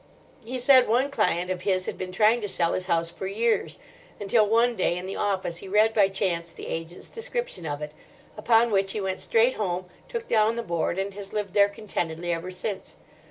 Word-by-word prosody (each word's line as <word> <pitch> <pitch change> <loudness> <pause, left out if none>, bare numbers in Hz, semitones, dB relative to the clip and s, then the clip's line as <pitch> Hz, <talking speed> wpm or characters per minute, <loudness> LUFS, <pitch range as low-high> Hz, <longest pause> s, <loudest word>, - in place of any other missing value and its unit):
He 250 +3 -5
said 255 0 +6
one 255 +5 +2
client 180 -9 +1
of 180 -1 -3
his 185 -1 0
had - - -4
been 185 0 -5
trying 220 +5 +3
to 205 - -2
sell 170 -3 0
his 185 0 -2
house 165 -1 0
for 190 - -6
years—until 220 - -1
one 235 +2 +3
day 180 -3 +1
in 180 - -5
the 190 - -5
office 190 -4 -1
he 195 - -9
read 215 +3 +3
by 205 -3 +5
chance 180 -4 -2
the - - -10
agent's 165 +2 -6
description 475 - -5
of 145 0 -4
it. 150 - -6 0.4
Upon 230 +2 +3
which 195 -1 +1
he - - -2
went 190 -1 -2
straight 230 +3 +3
home, 185 -3 -2 0.2
took 465 -1 -5
down 220 0 +3
the 235 - -3
board, 170 -2 -1
and 195 +1 -2
has 200 0 -9
lived 205 -3 -3
there 200 0 +5
contentedly 175 -5 -3
ever 170 +2 -4
since. 185 +2 -5
195 Hz, 210 wpm, -26 LUFS, 180-225 Hz, 0.4 s, said